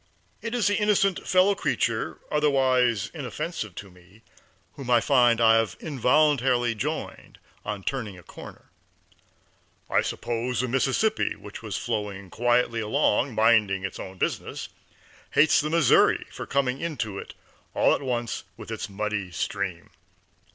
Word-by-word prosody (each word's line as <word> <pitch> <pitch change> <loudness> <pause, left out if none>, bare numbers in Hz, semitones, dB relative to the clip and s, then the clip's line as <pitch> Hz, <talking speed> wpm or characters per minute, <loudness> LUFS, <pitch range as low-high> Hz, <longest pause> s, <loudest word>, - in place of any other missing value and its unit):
It 230 +1 -4
is 240 - +1
the 205 0 +2
innocent 200 -3 +1
fellow 185 +2 +4
creature, 195 - -1
otherwise 130 -7 +2
inoffensive - - -5
to 100 -2 -9
me, 90 +5 -21 0.5
whom 135 -3 -8
I 120 -1 +5
find 120 -2 +4
I 115 -1 +6
have 115 -2 -1
involuntarily 130 -3 +2
joined 105 - -5 0.3
on 105 -2 -5
turning 110 -7 -4
a 90 - -14
corner. - - -13 1.2
I - - +4
suppose 120 +1 -2
the 130 - -1
Mississippi, 135 - +1
which - - -10
was - - -4
flowing 105 -5 -4
quietly 120 -1 +1
along, 110 +3 +1
minding 105 -4 +3
its 95 - -6
own 95 0 -8
business, - - -3 0.6
hates 155 +2 +5
the 150 - -2
Missouri 165 -4 +4
for - - -7
coming 135 -1 0
into 115 -12 -3
it - - -10 0.4
all - - +4
at - - -1
once 120 -5 -3
with - - -9
its 100 - -4
muddy 105 -1 -3
stream. 90 0 -4
120 Hz, 140 wpm, -26 LUFS, 105-140 Hz, 1.2 s, I